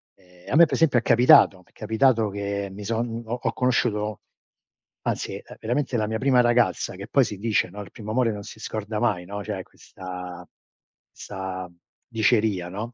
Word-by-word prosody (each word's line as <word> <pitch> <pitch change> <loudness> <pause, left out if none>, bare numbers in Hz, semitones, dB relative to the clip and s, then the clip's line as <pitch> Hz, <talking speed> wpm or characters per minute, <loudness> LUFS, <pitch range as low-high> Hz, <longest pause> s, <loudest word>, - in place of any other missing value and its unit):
Ehm, 90 0 -15
a - - +1
me 170 +1 +8
per - - -6
esempio 150 -6 +3
è - - -6
capitato 120 -5 +6
m'è - - -29
capitato 110 0 +2
che 100 0 -3
mi 100 +1 -8
son 115 +1 -2
ho 115 - -4
ho - - -1
conosciuto 110 -4 0 0.8
anzi, - - -2
ehm, - - -11
veramente 125 +3 -1
la 105 -1 0
mia 110 0 -2
prima 130 -2 +4
ragazza 120 -4 +1
che 100 +3 -8
poi 135 +3 +4
si 105 - -6
dice, 110 -1 +1
no, 105 - -8
il 100 - -11
primo 110 -2 -7
amore 120 -1 +2
non 105 -1 -6
si 110 - -11
scorda 110 -1 -4
mai, 100 -7 0
no, 100 +2 -6
c'è 100 -2 -4
questa 90 -1 -9 0.7
'sta 95 -1 -6 0.4
diceria, 110 -5 +1
no; 110 +6 -6
110 Hz, 185 wpm, -24 LUFS, 100-120 Hz, 0.8 s, me